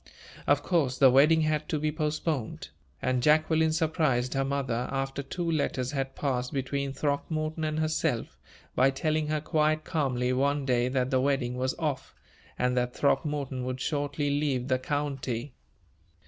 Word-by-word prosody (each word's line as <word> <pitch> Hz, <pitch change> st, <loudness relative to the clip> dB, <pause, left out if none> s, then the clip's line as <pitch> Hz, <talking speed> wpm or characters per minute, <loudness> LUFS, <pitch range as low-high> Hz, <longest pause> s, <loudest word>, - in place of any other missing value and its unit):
Of 145 Hz, 0 st, +3 dB
course, 145 Hz, -8 st, +1 dB
the 135 Hz, -2 st, +7 dB
wedding 150 Hz, +5 st, +5 dB
had 155 Hz, -1 st, 0 dB
to 155 Hz, -, 0 dB
be 150 Hz, +1 st, 0 dB
postponed; 150 Hz, -, -2 dB, 0.3 s
and 130 Hz, -1 st, +1 dB
Jacqueline 155 Hz, +3 st, +3 dB
surprised 155 Hz, -6 st, +1 dB
her 135 Hz, -, +1 dB
mother, 135 Hz, -3 st, -1 dB
after 135 Hz, 0 st, -2 dB
two 170 Hz, +4 st, -3 dB
letters 130 Hz, -4 st, -1 dB
had 135 Hz, -2 st, -3 dB
passed 125 Hz, -3 st, -1 dB
between 140 Hz, 0 st, -2 dB
Throckmorton 155 Hz, +3 st, -2 dB
and 155 Hz, 0 st, -1 dB
herself, 155 Hz, -, -1 dB, 0.4 s
by 130 Hz, +2 st, +4 dB
telling 155 Hz, +3 st, 0 dB
her 155 Hz, 0 st, 0 dB
quite 155 Hz, 0 st, +1 dB
calmly 130 Hz, -6 st, 0 dB
one 140 Hz, +2 st, +1 dB
day 125 Hz, -2 st, +2 dB
that 130 Hz, 0 st, 0 dB
the 130 Hz, -1 st, +3 dB
wedding 135 Hz, -3 st, 0 dB
was 130 Hz, +1 st, -1 dB
off, 150 Hz, -5 st, -3 dB, 0.4 s
and 125 Hz, 0 st, +1 dB
that 125 Hz, 0 st, 0 dB
Throckmorton 140 Hz, -3 st, 0 dB
would 130 Hz, 0 st, -3 dB
shortly 145 Hz, 0 st, -1 dB
leave 140 Hz, -3 st, 0 dB
the 130 Hz, 0 st, +2 dB
county. 135 Hz, -2 st, -3 dB
140 Hz, 155 wpm, -28 LUFS, 130-155 Hz, 0.4 s, the